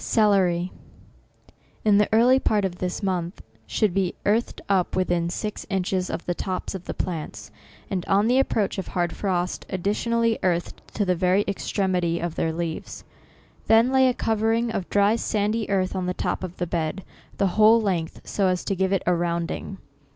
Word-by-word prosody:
CELERY, 185 -5 +2 1.1
in 205 -1 +5
the 210 - +2
early 245 +4 +5
part 210 -5 +1
of 180 -2 -4
this 180 +3 -3
month, 180 -2 -2 0.2
should 215 -5 +1
be 190 -2 0
earthed 220 +4 +1
up 190 -3 +1
to - - -2
within 175 -2 +1
six 210 +4 -4
inches 190 -1 -1
of - - -4
the 175 - 0
tops 185 +2 -4
of 190 -2 -7
the - - -4
plants, 150 -12 -5 0.4
and 190 -5 -2
on 200 +2 +3
the 250 +3 +3
approach 215 -7 0
of 190 - -5
hard 175 -1 -1
frost, 180 -3 -1
additionally 225 +4 0
earthed 175 -2 -1
to 205 - +1
the 185 - +2
very 185 +3 +2
extremity 185 -4 -1
of 170 -1 -3
their 165 - -1
leaves. 165 0 -5 0.6
Then 225 +3 +5
laj 265 -1 +5
a - - +1
covering 225 +1 +1
of 195 -5 -4
dry 205 +2 +3
sandy 215 0 -1
earth 190 -1 0
on 185 -1 -2
the 180 - -2
top - - -2
of 180 -1 -6
the 175 - -1
bed, 170 +2 -2 0.3
the 195 - +2
whole 215 +2 +6
length, 180 -7 -2
so 195 -2 0
as 180 -1 0
to 195 - -1
give 190 +1 0
it 195 - +1
a 180 - +3
rounding. 170 -1 -2
190 Hz, 185 wpm, -24 LUFS, 175-210 Hz, 1.1 s, whole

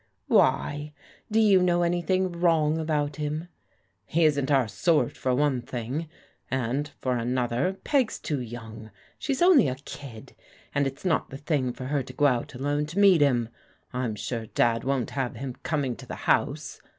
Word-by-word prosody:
" - - -48
Why? 145 +1 +2 0.4
Do 220 +1 +2
you 200 -4 +5
know 175 -1 +3
anything 175 +2 +1
wrong 165 -3 +2
about 150 -2 -1
him? 155 +3 -3 0.3
" - - -41 0.3
"He 165 - +2
isn't 140 -3 +2
our 135 -5 +3
sort 150 - +1
for 130 -1 0
one 140 -2 +1
thing, 130 +7 -4 0.4
and 130 +3 -1
for 130 -1 -1
another. 125 +8 0
Peg's 270 -6 +1
too 145 -3 -3
young. 110 -2 -8 0.3
She's 275 +3 0
only 350 - +6
a 130 - -1
kid, 115 -6 -9 0.4
and 140 -1 +2
it's 135 +6 -8
not 165 -5 +1
the 135 - -7
thing 140 -3 0
for 130 - -8
her 140 +1 0
to 130 - -9
go 145 - +2
out 125 -3 +1
alone 145 +3 -1
to 165 +5 -8
meet 195 -5 +6
him. 120 -5 +3 0.4
I'm 125 -3 -2
sure 115 +1 -4
Dad 115 +1 +1
won't 135 -3 -1
have 130 -3 -2
him 130 +2 -5
coming 140 -6 -1
to - - -11
the - - -5
house. - - 0
145 Hz, 180 wpm, -26 LUFS, 125-165 Hz, 0.4 s, only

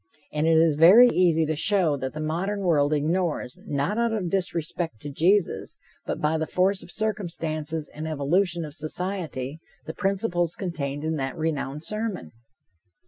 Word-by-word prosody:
And 150 +1 +1
it 165 -1 +5
is 160 -2 +4
very 200 +10 +8
easy 170 -6 +3
to 155 +1 -1
show 180 -2 +2
that 130 -1 -4
the 155 - -6
modern 175 +7 -2
world 155 -6 +2
ignores, 155 -2 -1
not 145 +10 -1
out 235 -1 +1
of 195 -6 -2
disrespect 170 - -2
to 145 - -6
Jesus, 180 +6 +1 0.3
but - - -2
by 155 +1 +1
the 160 - -2
force 190 +1 +1
of - - -12
circumstances 165 -7 -3
and 155 +1 -5
the - - -3
evolution 170 +3 0
of 150 - -9
society, 160 -4 -4 0.3
the 160 - -5
principles 185 -4 0
contained 145 -6 -4
in 160 0 -1
that 135 +4 -3
renowned 150 -2 -2
sermon. 215 - -3
165 Hz, 165 wpm, -25 LUFS, 150-185 Hz, 0.3 s, very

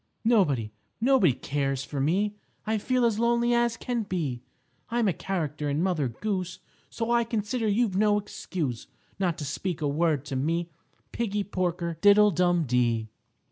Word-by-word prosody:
"_Nobody, 145 - +3 0.3
nobody 240 - +4
cares 135 +1 -2
for 140 -1 -4
me, 195 +8 +1 0.3
I 220 0 0
feel 250 +3 +1
as 225 -2 +1
lonely 235 +1 +2
as 235 -1 +2
can 245 -2 -2
be. 165 - -3 0.5
I'm 235 -1 +1
a 190 - +2
character 155 -4 -3
in 145 +4 0
Mother 175 -7 +1
Goose, 185 - -3 0.3
So 230 0 -3
I 235 0 +4
consider 225 0 -2
you've 210 -1 +1
no 205 +1 +3
excuse 165 - -4 0.3
Not 180 -4 0
to 150 - -5
speak 170 +4 -3
a 150 - 0
word 150 -1 +1
to 140 - -4
me, 165 +5 -1 0.4
Piggie 210 -3 -1
Porker, 175 -4 -2
diddle 205 +1 +6
dum 175 0 +2
dee. 120 -4 +1
185 Hz, 160 wpm, -27 LUFS, 150-215 Hz, 0.5 s, diddle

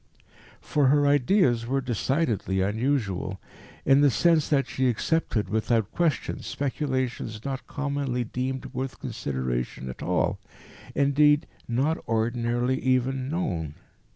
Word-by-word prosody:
For 145 -2 +2
her 145 +2 +4
ideas 140 - +3
were 135 +2 +1
decidedly 120 - 0
unusual, 100 -3 -1 0.5
in 135 +1 +5
the 145 - +6
sense 165 +3 +3
that 140 -3 +3
she 130 +1 0
accepted 120 - 0
without 110 +1 0
question 165 -7 0
speculations 130 -6 -3
not 135 -1 -4
commonly 140 -4 -2
deemed 130 +3 -4
worth 130 0 -4
consideration 65 - -3
at - - -12
all, - - 0 0.6
indeed 145 +1 +4 0.2
not 135 +7 +1
ordinarily 120 +3 0
even 130 +1 +1
known. 85 - -2
130 Hz, 115 wpm, -26 LUFS, 115-140 Hz, 0.6 s, the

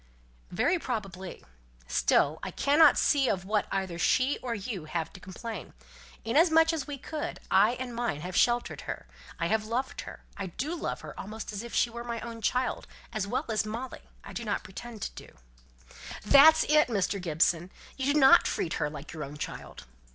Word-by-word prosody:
"Very 355 0 +1
probably. 195 - -5 0.4
Still 140 - +2
I - - -4
cannot 290 - +5
see 275 -3 +3
of 185 -1 -1
what 210 +1 0
either 190 -3 -2
she 260 +9 +2
or 240 -2 -3
you 200 -5 -5
have 160 +1 -3
to - - -11
complain. 195 +2 -7 0.5
Inasmuch 325 +6 +4
as 305 -4 -3
we 290 -1 -5
could, 300 +3 -5
I 205 +5 +5
and 250 -1 -5
mine 235 -11 -2
have 180 +2 -6
sheltered 240 0 +2
her! - - -5 0.3
I 165 - 0
have 215 +5 +1
loved 250 +4 -2
her; - - -10
I 195 - -4
do 275 - -4
love 345 - -4
her - - -8
almost 215 +2 -6
as 200 - -4
if 235 0 -7
she 235 - +2
were 235 +1 -6
my 235 -1 -4
own 230 -1 -7
child 250 +3 0 0.3
as 215 -3 -2
well 245 +5 -1
as 220 -1 +1
Molly, 230 +4 -6 0.2
I - - -10
do 235 - -4
not 210 -2 -2
pretend 215 +3 -8
to - - -7
do." - - -20 0.9
"That's 290 +7 +8
it, 300 0 +4
Mr. 200 -3 -1
Gibson! 170 +1 +1 0.3
you 270 +1 0
do 300 - +3
not 265 -1 +8
treat 165 - -1
her 150 - +1
like 150 0 -9
your 155 -2 -5
own 145 +1 -8
child." 105 - -7
225 Hz, 190 wpm, -29 LUFS, 185-260 Hz, 0.9 s, That's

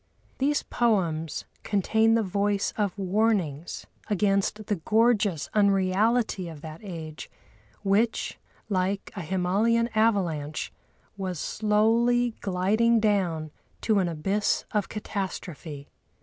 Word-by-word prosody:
These 290 +2 +1
poems 170 -9 0 0.2
contain 220 +3 +2
the 230 - +2
voice 200 +1 0
of 205 -2 -1
warnings 190 -6 0 0.2
against 205 +1 +1
the 205 - -1
gorgeous 210 -3 +2
unreality 200 0 +2
of 155 -3 -10
that 155 0 -9
age, 160 -5 -7 0.5
which, 210 +4 +1 0.3
like 195 0 -1
a 195 - -4
Himalayan 195 +7 +1
avalanche, 180 -10 0 0.4
was 185 -4 -3
slowly 230 +5 +2
gliding 210 +5 +2
down 180 -8 0 0.3
to 215 -3 +2
an 185 - +1
abyss 195 +6 0
of 210 -2 0
catastrophe. 180 -8 -5
200 Hz, 105 wpm, -27 LUFS, 180-220 Hz, 0.5 s, contain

